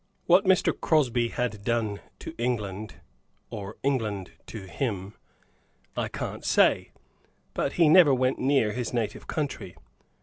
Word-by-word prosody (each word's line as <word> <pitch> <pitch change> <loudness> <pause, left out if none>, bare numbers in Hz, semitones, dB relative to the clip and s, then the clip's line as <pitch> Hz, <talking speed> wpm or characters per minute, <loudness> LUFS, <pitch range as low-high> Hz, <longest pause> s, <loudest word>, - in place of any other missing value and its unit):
What 180 +4 +5
Mr. 190 -1 +4
Crosby 125 -7 +2
had 115 -4 -3
done 110 -3 -1 0.2
to - - -7
England, 110 -4 -2 0.6
or 105 -1 -7
England 110 -9 -1 0.2
to 110 -4 -7
him, 100 -2 -3 0.8
I - - -1
can't - - -5
say, - - +3 0.6
but 140 - -1
he 170 -2 +4
never 160 -1 +7
went 130 0 +1
near 135 -5 +2
his 125 +2 -3
native 115 -3 -3
country. 150 -4 -4
120 Hz, 130 wpm, -27 LUFS, 105-140 Hz, 0.8 s, never